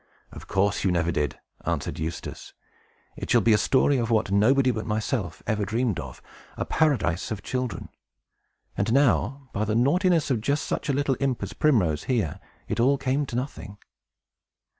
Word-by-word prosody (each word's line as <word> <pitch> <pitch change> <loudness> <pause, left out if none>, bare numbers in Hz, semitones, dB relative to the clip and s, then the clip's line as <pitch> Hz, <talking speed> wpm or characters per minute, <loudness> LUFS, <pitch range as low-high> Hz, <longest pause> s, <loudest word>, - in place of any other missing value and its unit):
"Of - - -11
course, 100 +1 +1
you 95 - +2
never 85 -1 +1
did," 75 -2 -2 0.2
answered - - -2
Eustace. 80 +2 -6 0.6
"It - - -7
shall - - +5
be 115 - +4
a - - +5
story 135 +5 +3
of 115 -1 -1
what 110 -4 +1
nobody 125 +6 +4
but 110 -2 -4
myself 105 - -2
ever 105 -1 0
dreamed 110 - 0
of, 65 -3 -8 0.3
a - - -2
Paradise 130 - +1
of 110 -3 -5
children, 125 -9 -3 0.9
and 100 +3 0
how, 135 0 +1
by 105 - -1
the 110 0 0
naughtiness 160 +5 +2
of 120 -4 +1
just 140 +6 0
such - - -3
a - - +2
little 140 -2 0
imp 135 -2 -1
as - - -5
Primrose 95 - +2
here, 110 - -1 0.3
it - - -2
all 135 +4 +4
came 135 +1 0
to 120 - -6
nothing." 125 -5 -5
115 Hz, 175 wpm, -26 LUFS, 100-135 Hz, 0.9 s, shall